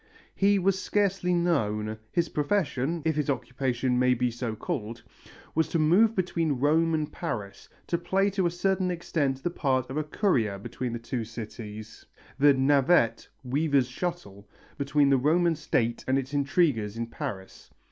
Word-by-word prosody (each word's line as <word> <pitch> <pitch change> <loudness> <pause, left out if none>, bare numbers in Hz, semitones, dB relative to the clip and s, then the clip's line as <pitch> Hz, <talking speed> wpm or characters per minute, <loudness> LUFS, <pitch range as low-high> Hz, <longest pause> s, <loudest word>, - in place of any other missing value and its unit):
He 200 +1 +3
was 190 0 +1
scarcely 195 -3 0
known. 110 -12 0
His 170 -1 +1
profession 150 -1 -1
if 160 -2 +1
his 150 -1 -1
occupation 125 -1 -1
may 125 0 +4
be 125 0 0
so 120 -1 -4
called 115 +2 -5 0.5
was 160 0 +1
to - - -1
move 185 +9 +4
between 170 -4 0
Rome 160 +4 +3
and 155 -1 -2
Paris, 100 - -5 0.2
to 170 - -1
play 195 +3 +1
to 190 -2 +1
a - - +1
certain 185 +1 0
extent 150 -6 -1
the 175 - -1
part 130 -6 0
of 140 - -4
a 155 - +1
courier 130 - 0
between 120 +4 -5
the - - -2
two 115 +1 -4
cities, 110 -1 -8 0.4
the 145 0 +6
navette 135 -3 +3 0.2
(weaver's 140 0 +1
shuttle) 125 - -5 0.3
between 140 0 +2
the 135 - +5
Roman 165 +5 +2
State 120 -6 -1
and 130 +1 +2
its 135 +1 -4
intriguers 140 - +1
in 115 - -2
Paris. 115 -6 -7
140 Hz, 160 wpm, -27 LUFS, 120-170 Hz, 0.5 s, the